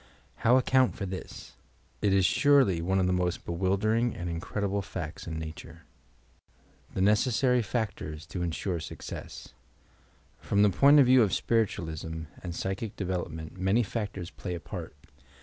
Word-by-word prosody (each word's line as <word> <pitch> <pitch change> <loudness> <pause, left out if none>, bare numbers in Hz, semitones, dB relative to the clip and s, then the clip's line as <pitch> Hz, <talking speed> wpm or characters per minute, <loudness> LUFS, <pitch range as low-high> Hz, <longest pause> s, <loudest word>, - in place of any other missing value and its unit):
How 120 +3 +4
account 130 0 +3
for 100 - -4
this 95 0 -8 0.5
I 105 - +2
It 100 - +3
is 95 -2 +4
surely 135 - +4
one 95 +3 0
of 95 - +2
the 90 - +1
most 90 -1 -1
be - - -4
wildering 105 +6 +1
and 85 -1 -4
incredible 100 +4 -2
facts 90 -6 -6
in 80 -1 -4
Nature. 80 0 -8 1.1
THE - - 0
NBCESSART 120 +3 +2
PACTO&S 100 -10 -3
TO 90 +3 -5
INSURE 85 +1 -2
SUCCESS 80 - -8 0.9
From 100 0 +2
the 105 - +5
point 140 +9 +6
of 140 - +7
view 130 0 +6
of 105 -4 +2
spiritualism 80 -8 -1 0.2
and 85 -2 -6
psychic 95 +4 -3
development, 90 -3 -4
many 95 +6 +2
factors 100 -5 -4
play 90 -3 -5
a - - -5
part. 75 - -8
95 Hz, 155 wpm, -29 LUFS, 85-110 Hz, 1.1 s, of